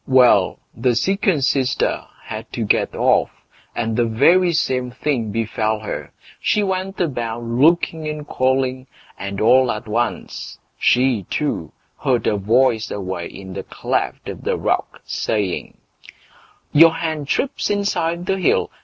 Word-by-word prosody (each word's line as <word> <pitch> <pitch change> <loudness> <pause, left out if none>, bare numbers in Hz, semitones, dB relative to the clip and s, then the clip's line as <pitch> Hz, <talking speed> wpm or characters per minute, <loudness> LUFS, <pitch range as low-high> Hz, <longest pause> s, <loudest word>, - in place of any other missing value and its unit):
Well! 130 -2 +5 0.2
the 120 +1 +1
second 190 - +1
sister 135 0 +1 0.2
had - - -7
to - - -2
get - - +1
off, - - +3 0.5
and 115 -1 -1
the 120 - +2
very 175 +11 +4
same 130 -6 0
thing 125 -3 -2
befell 110 0 -1
her; 105 - -5 0.3
she 210 - +1
went 190 0 -2
about 120 -8 -2
looking 155 +6 +2
and 150 -1 -5
calling, 130 0 0 0.3
and 100 0 -4
all 125 +3 +5
at 110 +1 -5
once 115 +2 -3 0.2
she 125 -6 +2
too 145 - -2 0.3
heard 125 -4 +1
a - - +2
voice 115 +2 +2
away 95 -3 -4
in 95 -1 -10
the - - -4
cleft - - -3
of - - -6
the - - -1
rock - - -1
saying: 100 -5 -2 0.9
Your 165 +2 +7
hen 160 -3 -3
trips 260 - -1
inside 175 -4 0
the 195 0 0
hill! 180 - +2
130 Hz, 140 wpm, -20 LUFS, 115-160 Hz, 0.9 s, Your